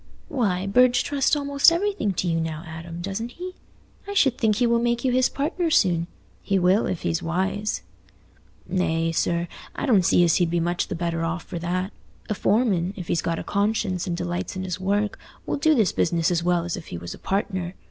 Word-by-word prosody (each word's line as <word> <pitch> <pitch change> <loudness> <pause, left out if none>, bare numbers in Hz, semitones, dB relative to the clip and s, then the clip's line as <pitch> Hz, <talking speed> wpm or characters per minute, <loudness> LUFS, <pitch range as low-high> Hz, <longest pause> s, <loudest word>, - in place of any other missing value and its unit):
"Why, 205 - 0
Burge 245 +4 +4
trusts 285 +1 +1
almost 280 +1 +4
everything 350 - 0
to 180 - -1
you 165 -1 +1
now, 160 0 -4
Adam, 165 +1 -7
doesn't 210 +6 -4
he? 365 +1 -7 0.5
I 405 - -5
should 270 - +4
think 220 -4 +2
he 245 - +2
will 235 0 +3
make 240 +1 0
you 255 - +3
his 255 +1 +3
partner 330 +4 -1
soon. 180 - +3 0.3
He 195 - +1
will, 185 +4 +3
if 180 - -3
he's 165 +2 0
wise." 190 +5 -1 0.8
"Nay, 165 -3 0
sir, 170 +1 0 0.3
I - - -2
don't 225 -9 +5
see 175 - +4
as 170 -2 +4
he'd 175 -2 +2
be 170 +1 +1
much 175 +1 0
the - - -4
better 165 -1 -2
off 170 +1 -2
for 170 - -6
that. 185 +3 -2 0.4
A - - +1
foreman, 200 -4 +1
if 180 -4 -7
he's 165 - +1
got 165 0 -1
a - - -4
conscience 200 -3 0
and 170 -1 -2
delights 175 +1 -3
in 185 - -3
his 185 -1 -4
work, 205 +2 0 0.3
will - - -1
do 310 +2 +4
his 220 -7 +3
business 170 0 +1
as 170 -1 +1
well 175 -1 +2
as 175 - -2
if 175 - -9
he 85 - -6
was 85 +1 -7
a - - -12
partner. 190 -2 -2
185 Hz, 215 wpm, -24 LUFS, 170-235 Hz, 0.8 s, don't